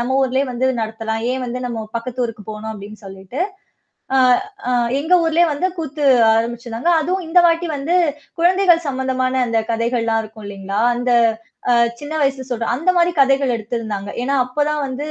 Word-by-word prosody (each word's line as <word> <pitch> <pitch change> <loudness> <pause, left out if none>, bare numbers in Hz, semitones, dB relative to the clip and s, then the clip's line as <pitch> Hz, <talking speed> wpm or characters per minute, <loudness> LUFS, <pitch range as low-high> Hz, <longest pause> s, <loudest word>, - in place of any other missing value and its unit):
நம்ம 260 +2 0
ஊர்லேயே 265 +1 +1
வந்து 250 +2 0 0.2
நடத்தலாம் 220 0 -3
ஏன் 260 -1 -3
வந்து 250 +1 -4
நம்ம 230 -2 -4
பக்கத்து 245 +1 -3
ஊருக்கு 220 -3 -9
போணும் 215 +1 -6
அப்டின்னு 210 0 -11
சொல்லிட்டு. 195 - -8 0.7
ஆ, - - +4 0.5
அ - - +1 0.3
எங்க 320 +5 +2
ஊர்லயே 330 +2 +3
வந்து 295 +6 0
கூத்து 300 -2 -3 0.3
ஆரம்பிச்சுருந்தாங்க. 235 +5 -2
அதுவும் 365 +2 -2
இந்த 355 +2 +4
வாட்டி 335 +1 0
வந்து 315 +6 0 0.4
குழந்தைகள் 350 -1 +4
சம்பந்தமான 260 -1 -1
அந்த 230 - +1
கதைகள்லாம் 230 -1 0
இருக்கும் 215 0 -12
இல்லீங்களா 195 +1 -4 0.2
அந்த 245 +1 -1 0.6
அ - - +5 0.2
சின்ன 290 +1 -7
வயசுல 275 -2 0
சொல்ற 235 -2 -2
அந்த 330 +8 +1
மாதிரி 345 0 +4
கதைகள் 270 -1 +3
எடுத்திருந்தாங்க. 215 -3 -4
ஏன்னா 275 +3 0
அப்பதான் 295 +4 -1
வந்து 270 +3 -5
255 Hz, 165 wpm, -19 LUFS, 225-295 Hz, 0.7 s, அ